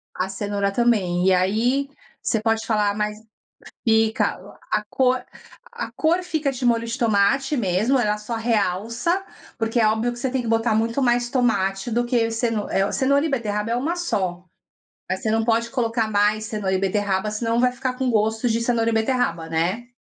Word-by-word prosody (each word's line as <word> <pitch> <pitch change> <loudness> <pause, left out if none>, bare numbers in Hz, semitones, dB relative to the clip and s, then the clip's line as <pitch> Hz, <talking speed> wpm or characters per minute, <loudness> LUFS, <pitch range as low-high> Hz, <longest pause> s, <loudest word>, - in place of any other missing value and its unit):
A 185 +1 -2
cenoura 200 0 -2
também. 195 -6 +1
E 190 - +5
aí, 225 +10 +1 0.3
você 225 - 0
pode 225 0 0
falar, 210 -2 +1
mas 210 0 -2 0.7
fica 220 0 +3 0.5
a 210 0 0
cor 255 +1 +1 0.5
a - - -4
cor 340 +3 +1
fica 310 -5 -1
de 255 -1 -2
molho 230 -1 +2
de 230 +4 -4
tomate 240 +5 +2
mesmo, 215 +4 +1
ela 210 -3 +1
só 220 +2 -5
realça, 230 - 0 0.3
porque 225 0 0
é 220 - +4
óbvio 220 +3 0
que 240 - -9
você 260 +2 -2
tem 260 -1 -1
que 235 - -5
botar 225 0 +2
muito 230 +4 0
mais 240 -1 +1
tomate 200 -5 0
do 240 +2 +1
que, 235 -2 +1
ce 225 +1 0 0.2
eh, 195 +1 +1
cenoura 280 +2 +2
e 320 - -1
beterraba 215 -4 -2
é 235 - +1
uma 310 +8 -1
só, 185 - -2 0.7
você 190 +4 -2
não 225 0 +1
pode 230 0 +1
colocar 230 -3 0
mais 210 +1 +2
cenoura 210 -3 -2
e - - +2
beterraba, 195 +1 0
senão 230 +2 0
vai 250 0 +4
ficar 255 +1 -3
com 260 -2 0
gosto 220 +2 +1
de 230 0 0
cenoura 230 -1 +1
e 230 - +1
beterraba, 220 -8 0
né. 185 +9 -1
225 Hz, 185 wpm, -23 LUFS, 210-245 Hz, 0.7 s, E